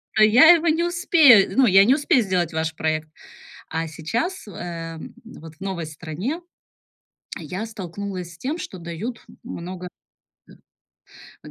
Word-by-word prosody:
То 215 Hz, -, +5 dB
я 245 Hz, +10 st, +7 dB
его 340 Hz, -1 st, +3 dB
не 325 Hz, +2 st, +1 dB
успею, 325 Hz, -, +5 dB
ну, 265 Hz, -, +6 dB
я 195 Hz, -2 st, +6 dB
не 260 Hz, +4 st, +4 dB
успею 280 Hz, -5 st, +2 dB
сделать 180 Hz, -4 st, -1 dB
ваш 160 Hz, 0 st, -2 dB
проект" 155 Hz, -1 st, -2 dB, 0.6 s
А 165 Hz, 0 st, -3 dB
сейчас, 225 Hz, -, -4 dB
э, -, -, -9 dB
м, 165 Hz, -2 st, -7 dB
вот 160 Hz, -8 st, -12 dB
в -, -, -39 dB
новой 190 Hz, -4 st, -4 dB
стране 165 Hz, -, -5 dB, 1.0 s
я 180 Hz, +7 st, -5 dB
столкнулась 190 Hz, -3 st, -7 dB
с -, -, -19 dB
тем, 280 Hz, +6 st, -3 dB
что 185 Hz, -, -8 dB
дают 170 Hz, +8 st, -6 dB
м -, -, -16 dB
много 180 Hz, +1 st, -7 dB, 1.6 s
Да. -, -, -10 dB
190 Hz, 150 wpm, -22 LUFS, 165-250 Hz, 1.6 s, я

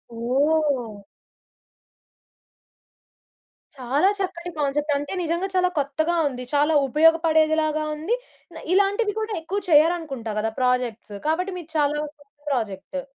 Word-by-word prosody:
ఓహ్! 260 Hz, -2 st, 0 dB, 2.8 s
చాలా 270 Hz, +7 st, +1 dB
చక్కటి 350 Hz, -2 st, -4 dB
కాన్సెప్ట్ 295 Hz, +1 st, 0 dB
అంటే 290 Hz, +4 st, -5 dB
నిజంగా 340 Hz, +3 st, -1 dB
చాలా 365 Hz, 0 st, +3 dB
కొత్తగా 310 Hz, +5 st, 0 dB
ఉంది, 250 Hz, -2 st, -5 dB
చాలా 295 Hz, +2 st, +3 dB
ఉపయోగపడేదిలాగా 315 Hz, 0 st, +3 dB
ఉంది, 325 Hz, +10 st, -1 dB, 0.6 s
ఇలాంటివి 405 Hz, +2 st, +2 dB
కూడా 435 Hz, 0 st, -3 dB
ఎక్కువ 390 Hz, +5 st, -3 dB
చేయరనుకుంటా 300 Hz, -7 st, +2 dB
కదా! 225 Hz, +1 st, -1 dB
ప్రాజెక్ట్సు 250 Hz, -5 st, -1 dB
కాబట్టి 365 Hz, +5 st, 0 dB
మీరు 335 Hz, -2 st, -11 dB
చాలా 295 Hz, 0 st, +2 dB
గొప్ప 300 Hz, 0 st, -9 dB, 0.3 s
ప్రాజెక్టు. 230 Hz, +2 st, -3 dB
305 Hz, 105 wpm, -23 LUFS, 265-335 Hz, 2.8 s, చాలా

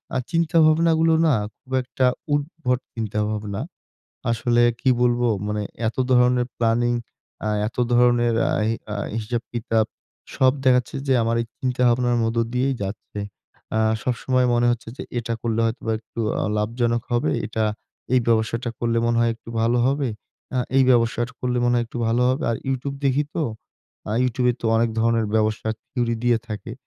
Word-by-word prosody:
আর 130 Hz, -, +1 dB
চিন্তা 165 Hz, 0 st, +1 dB
ভাবনাগুলো 160 Hz, +1 st, +4 dB
না 155 Hz, -, +4 dB, 0.2 s
খুব 130 Hz, -, -21 dB
একটা 130 Hz, +1 st, -1 dB, 0.3 s
উদ্ভট 145 Hz, -3 st, -1 dB, 0.2 s
চিন্তাভাবনা। 105 Hz, -2 st, -2 dB, 0.7 s
আসলে 120 Hz, +1 st, +2 dB, 0.2 s
কি 130 Hz, -, +3 dB
বলবো? 120 Hz, 0 st, +2 dB, 0.2 s
মানে 105 Hz, 0 st, -2 dB, 0.2 s
এতো 115 Hz, +3 st, -1 dB
ধরনের 125 Hz, 0 st, +4 dB
প্ল্যানিং 120 Hz, +1 st, +2 dB, 0.5 s
আ -, -, +1 dB, 0.2 s
এত -, -, -17 dB, 0.2 s
ধরণের 120 Hz, -1 st, +4 dB, 0.2 s
আ -, -, 0 dB, 0.2 s
হি 115 Hz, -, +1 dB, 0.2 s
আ -, -, -2 dB, 0.2 s
হিসাব 115 Hz, +2 st, -2 dB
কিতাব 115 Hz, -2 st, +1 dB, 0.5 s
সব 130 Hz, -1 st, +5 dB
দেখাচ্ছে 125 Hz, 0 st, +3 dB
যে 135 Hz, -, +4 dB
আমার 115 Hz, +1 st, +1 dB
এই -, -, -8 dB
চিন্তা 125 Hz, -1 st, -1 dB
ভাবনার 120 Hz, 0 st, +2 dB
মধ্য 115 Hz, +1 st, -1 dB
দিয়েই 130 Hz, +2 st, +1 dB
যাচ্ছে। 100 Hz, +1 st, -6 dB, 0.6 s
আ -, -, +3 dB, 0.2 s
সবসময় 125 Hz, 0 st, +1 dB
মনে 120 Hz, 0 st, +3 dB
হচ্ছে 120 Hz, -1 st, -3 dB
যে -, -, -6 dB, 0.2 s
এটা 115 Hz, 0 st, -3 dB
করলে 115 Hz, -1 st, 0 dB
হয়তোবা 115 Hz, 0 st, -2 dB
একটু 115 Hz, +1 st, -8 dB, 0.2 s
আ -, -, 0 dB
লাভজনক 115 Hz, +2 st, 0 dB
হবে। 120 Hz, +6 st, +1 dB, 0.2 s
এটা, 110 Hz, 0 st, -1 dB, 0.5 s
এই 125 Hz, -, +5 dB
ব্যবসাটা 115 Hz, +1 st, +1 dB
করলে 115 Hz, -1 st, +1 dB
মনে 120 Hz, 0 st, +2 dB
হয় 115 Hz, -, +3 dB
একটু 115 Hz, -, -18 dB
ভালো 120 Hz, +2 st, +2 dB
হবে। 140 Hz, 0 st, +1 dB, 0.5 s
আ -, -, +2 dB, 0.2 s
এই 135 Hz, -, +6 dB
ব্যবসাটা 120 Hz, 0 st, +2 dB
করলে 125 Hz, -1 st, 0 dB
মনে 120 Hz, 0 st, +3 dB
হয় 120 Hz, -, +1 dB
একটু 120 Hz, -, -7 dB
ভালো 120 Hz, +2 st, +2 dB
হবে। 130 Hz, +5 st, -1 dB
আর 115 Hz, -, 0 dB
YouTube 140 Hz, +1 st, -3 dB
দেখি 135 Hz, +2 st, +3 dB
তো 165 Hz, -, 0 dB, 0.7 s
আ -, -, -1 dB
YouTube 125 Hz, 0 st, +1 dB
এ -, -, +1 dB
তো 115 Hz, -, 0 dB
অনেক 115 Hz, 0 st, +2 dB
ধরনের 115 Hz, -1 st, +2 dB
ব্যবসা 110 Hz, 0 st, +1 dB, 0.2 s
থিওরি 120 Hz, -2 st, 0 dB
দিয়ে 120 Hz, -2 st, +4 dB
থাকে। 110 Hz, +2 st, -6 dB
120 Hz, 170 wpm, -23 LUFS, 115-125 Hz, 0.7 s, এই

